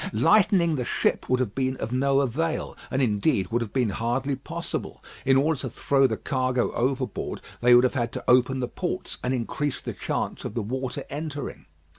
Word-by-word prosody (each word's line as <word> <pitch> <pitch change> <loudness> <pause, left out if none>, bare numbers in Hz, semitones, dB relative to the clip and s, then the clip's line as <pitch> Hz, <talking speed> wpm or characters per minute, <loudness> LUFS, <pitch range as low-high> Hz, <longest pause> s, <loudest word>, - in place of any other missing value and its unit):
Lightening 180 -2 +4
the 125 - -1
ship - - 0
would 130 0 +3
have 120 -6 -1
been 130 -1 -1
of 115 - -4
no 135 +2 +3
avail, 155 +5 -1
and 135 +1 +1
indeed 105 - +1
would 120 +1 +1
have 110 -3 -4
been 125 -4 +1
hardly 125 +6 -1
possible. 165 +5 -5 0.3
In 135 0 +5
order 150 +1 +2
to 130 - -3
throw 135 +3 +2
the 110 -3 -2
cargo 130 -3 0
overboard, 130 -2 -1 0.2
they 120 0 +7
would 120 - +7
have 130 - +2
had 120 -3 -1
to - - -5
open 130 +1 +4
the 125 - -1
ports 180 +6 -4
and 125 - 0
increase 130 +3 -2
the - - -5
chance - - -3
of - - -5
the 115 - -1
water 130 +4 -3
entering. 145 - -5
130 Hz, 195 wpm, -26 LUFS, 120-140 Hz, 0.3 s, they